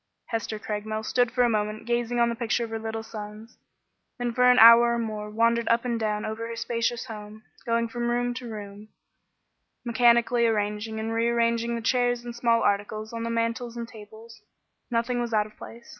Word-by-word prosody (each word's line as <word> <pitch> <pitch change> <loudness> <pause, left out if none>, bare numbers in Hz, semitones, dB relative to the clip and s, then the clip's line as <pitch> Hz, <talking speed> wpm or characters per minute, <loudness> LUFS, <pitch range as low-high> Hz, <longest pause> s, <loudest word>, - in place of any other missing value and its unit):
Hester 225 -1 -3
Craigmile 215 +1 -4
stood 245 +1 +2
for 250 -1 +2
a - - +4
moment 215 0 -2
gazing 240 0 -1
on 235 0 +4
the - - -1
picture 235 0 -1
of 230 - -6
her 225 - -3
little 225 0 -4
sons, 215 0 -10 0.6
then 245 -1 -2
for 250 +1 +4
an 250 - +5
hour 235 +1 +8
or - - -1
more 215 -2 -4
wandered 230 +2 +1
up 230 +1 +2
and 235 -2 -1
down 210 -1 -1
over 220 +1 -4
her 230 - -6
spacious 230 0 -2
home, 215 0 -9 0.2
going 230 0 +1
from 240 +1 -3
room 245 0 0
to 245 -1 -7
room, 205 -1 -8 1.0
mechanically 235 0 +3
arranging 210 0 -2
and 225 +1 -3
rearranging 235 0 +1
the 230 - -4
chairs 245 0 +1
and 240 -1 -6
small 235 -1 +2
articles 215 +2 -1
on 230 - -4
the 230 - -3
mantels 230 +1 -2
and 235 -1 -5
tables. 220 +1 -13 0.5
Nothing 240 +1 0
was 235 -1 -3
out 210 -1 +3
of 215 - -15
place. 235 +1 -12
230 Hz, 195 wpm, -26 LUFS, 220-235 Hz, 1.0 s, hour